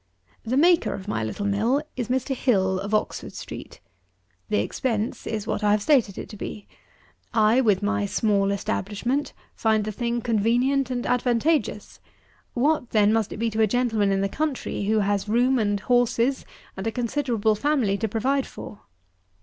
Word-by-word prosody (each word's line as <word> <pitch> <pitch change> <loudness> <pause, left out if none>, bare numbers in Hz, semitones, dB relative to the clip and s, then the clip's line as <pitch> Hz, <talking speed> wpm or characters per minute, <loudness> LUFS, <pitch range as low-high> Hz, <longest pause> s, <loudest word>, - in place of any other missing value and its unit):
98. - - -6
The 255 - +1
maker 340 +3 +4
of 190 - -9
my 115 - -1
little 110 - -4
mill 215 +7 +1 0.2
is 245 -3 -3
Mr. 260 +2 -1
HILL, 190 -7 +1
of 200 +2 -5
Oxford 215 - -1
street. - - -9 0.7
The - - +1
expense 220 - -2
is 215 -2 -3
what 220 -1 -2
I 210 - +3
have 210 0 +3
stated 245 -9 +2
it - - -6
to - - -9
be. 205 0 -7 0.7
I, 220 +3 +4
with 205 -5 +2
my 205 0 0
small 200 -1 +1
establishment, 215 +6 -2 0.2
find 220 -1 +1
the 215 - -3
thing 235 +2 -2
convenient 240 +5 +1
and 245 -1 -3
advantageous; 250 +5 0 0.6
what 265 0 +1
then 210 -1 +3
must 225 -2 0
it - - -6
be 230 +1 -1
to 220 +1 0
a 220 - +5
gentleman 225 -3 +1
in 195 0 +1
the 195 - +1
country 270 -4 -3
who 215 +1 +2
has 200 0 -1
room 250 +3 +3
and 205 -2 0
horses, 245 +2 +1 0.3
and 190 +3 -4
a - - 0
considerable 235 -2 0
family 240 -3 +1
to 225 - 0
provide 260 +6 0
for? 205 - -10
225 Hz, 175 wpm, -24 LUFS, 205-250 Hz, 0.7 s, a